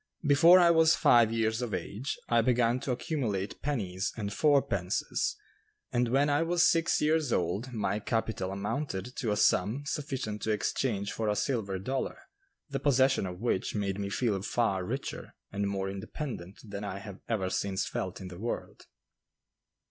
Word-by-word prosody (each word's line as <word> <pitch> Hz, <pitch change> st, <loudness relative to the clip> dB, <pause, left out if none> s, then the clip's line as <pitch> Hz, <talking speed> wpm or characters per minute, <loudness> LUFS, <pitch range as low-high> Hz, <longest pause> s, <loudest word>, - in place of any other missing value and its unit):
Before 165 Hz, +6 st, +7 dB
I 170 Hz, -1 st, +6 dB
was 160 Hz, -1 st, +5 dB
five 115 Hz, -2 st, +5 dB
years 110 Hz, 0 st, 0 dB
of 120 Hz, -3 st, -2 dB
age, 120 Hz, +8 st, -4 dB
I 120 Hz, -1 st, +4 dB
began 120 Hz, 0 st, +2 dB
to 135 Hz, -, -3 dB
accumulate 120 Hz, -, -2 dB
pennies 100 Hz, -10 st, -2 dB
and 100 Hz, -2 st, -3 dB
"four 145 Hz, 0 st, +4 dB
pences," 90 Hz, -1 st, -1 dB, 0.6 s
and 120 Hz, 0 st, +2 dB
when 135 Hz, +4 st, +3 dB
I 145 Hz, +1 st, +2 dB
was 170 Hz, +1 st, +3 dB
six 165 Hz, 0 st, +2 dB
years 155 Hz, -3 st, +2 dB
old 105 Hz, +8 st, -1 dB
my 105 Hz, -2 st, -1 dB
capital 110 Hz, -3 st, -2 dB
amounted 100 Hz, +2 st, -3 dB
to 120 Hz, -, -1 dB
a 105 Hz, -, 0 dB
sum 105 Hz, +6 st, +2 dB
sufficient 135 Hz, -8 st, -3 dB
to -, -, -2 dB
exchange 105 Hz, -1 st, -1 dB
for 110 Hz, -1 st, -1 dB
a 105 Hz, -, +1 dB
silver 105 Hz, -3 st, -1 dB
dollar, 130 Hz, +8 st, -3 dB, 0.5 s
the 140 Hz, -2 st, -3 dB
possession 135 Hz, -6 st, +3 dB
of 90 Hz, +1 st, -7 dB
which 115 Hz, -5 st, -1 dB
made 100 Hz, -1 st, -1 dB
me 100 Hz, 0 st, -2 dB
feel 100 Hz, -2 st, 0 dB
far 100 Hz, -3 st, 0 dB
richer 130 Hz, +9 st, -5 dB, 0.2 s
and 100 Hz, 0 st, -1 dB
more 95 Hz, -1 st, -2 dB
independent 100 Hz, -, -6 dB
than 100 Hz, -2 st, -6 dB
I 100 Hz, -2 st, -4 dB
have 100 Hz, -1 st, -9 dB
ever 95 Hz, -5 st, 0 dB
since 95 Hz, -1 st, -1 dB
felt 95 Hz, -1 st, -4 dB
in 95 Hz, -2 st, -7 dB
the 90 Hz, -1 st, -10 dB
world. 115 Hz, +3 st, -5 dB
110 Hz, 170 wpm, -30 LUFS, 100-135 Hz, 0.6 s, Before